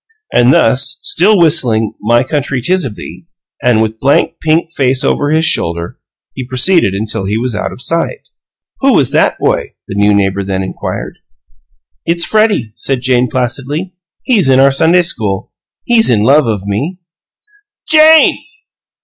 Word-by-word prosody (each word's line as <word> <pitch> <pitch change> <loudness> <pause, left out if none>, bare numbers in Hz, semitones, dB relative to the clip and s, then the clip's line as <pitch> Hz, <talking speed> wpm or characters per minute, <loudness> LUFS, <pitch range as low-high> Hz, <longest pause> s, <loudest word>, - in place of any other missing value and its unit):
And 120 +1 +4
thus, 130 +4 +2
still 200 +5 +2
whistling 130 - +2
"My 120 +3 +2
country, 140 -1 -2
'tis 185 +8 0
of 110 -5 -6
thee," 165 - -11 0.3
and 115 -3 +2
with 110 0 -5
blank 140 +2 0
pink 160 +1 0
face 130 -3 0
over 145 - 0
his 160 +1 +1
shoulder, 85 - -1 0.3
he 130 - -6
proceeded 130 - +2
until 105 -1 -3
he 105 +3 -2
was 125 +1 -2
out - - -3
of 125 - -5
sight. 170 - -2 0.5
"Who 270 -1 +2
was 135 - +2
that - - +1
boy?" - - -2
the - - -7
new 100 +1 +2
neighbor 100 -1 0
then 95 0 -3
inquired. 95 - -6 0.8
"It's 170 +1 0
Freddie," 215 - 0
said 135 -2 -2
Jane, 125 -1 +1
placidly. 135 +9 -3 0.3
"He's 210 - +2
in 130 0 +4
our 135 +1 +4
Sunday 165 +6 +3
school. 105 - -3 0.3
He's 235 -2 +2
in 110 -4 +2
love 140 +3 +3
of 105 -3 -3
me." 140 - -4 0.9
"JANE!" 315 0 +5
130 Hz, 160 wpm, -12 LUFS, 110-165 Hz, 0.9 s, JANE